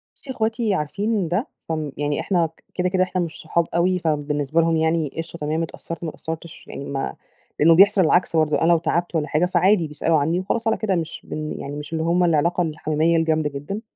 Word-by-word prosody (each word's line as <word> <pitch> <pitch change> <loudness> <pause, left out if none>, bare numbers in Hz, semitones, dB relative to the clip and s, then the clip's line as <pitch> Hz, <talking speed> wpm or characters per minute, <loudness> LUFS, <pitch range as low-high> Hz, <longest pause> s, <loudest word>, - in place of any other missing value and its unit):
بُصي، 270 - -9
أخواتي 225 -2 0
عارفين 195 +5 -1
ده، 180 - -1 0.2
هم 155 -3 -2
يعني 145 0 -1
إحنا، 175 -4 +1
ك 160 - -25
كده، 180 0 0
كده، 185 0 +2
إحنا 185 0 -1
مش 165 -3 -5
صحاب 165 +1 0
أوي، 180 +2 +2
فبالنسبة 150 -1 0
لهم 165 0 +2
يعني 160 -2 +1
قشطة، 165 +1 -6
تمام، 155 +2 -1
اتأثَّرت، 165 +1 -7
ما 165 - -2
اتأثَّرتش 160 +1 -8
يعني 140 - -7
ما 135 -1 -3 0.5
إنه 165 +2 +7
بيحصَل 200 +2 +6
العكس 175 +1 +2
برضه، 155 -2 +2
أنا 165 +1 +4
لو 170 - +6
تعبت 170 +2 -1
والّا 150 -2 0
حاجة، 155 +3 +2
فعادي، 185 -1 +3
بيسألوا 150 +2 +1
عنّي 160 +5 +1
وخلاص 220 +5 -2
على 225 - +2
كده 205 -4 0
مش 165 -2 -4
بن 155 0 -5
يعني 140 +1 -6
مش 150 +2 -7
اللي 160 - -1
هُم 170 +2 +2
العلاقة 170 +1 +2
الحميميَّة 155 0 +1
الجامدة 160 -2 +1
جدًا. 145 +10 -5
165 Hz, 210 wpm, -22 LUFS, 155-180 Hz, 0.5 s, إنه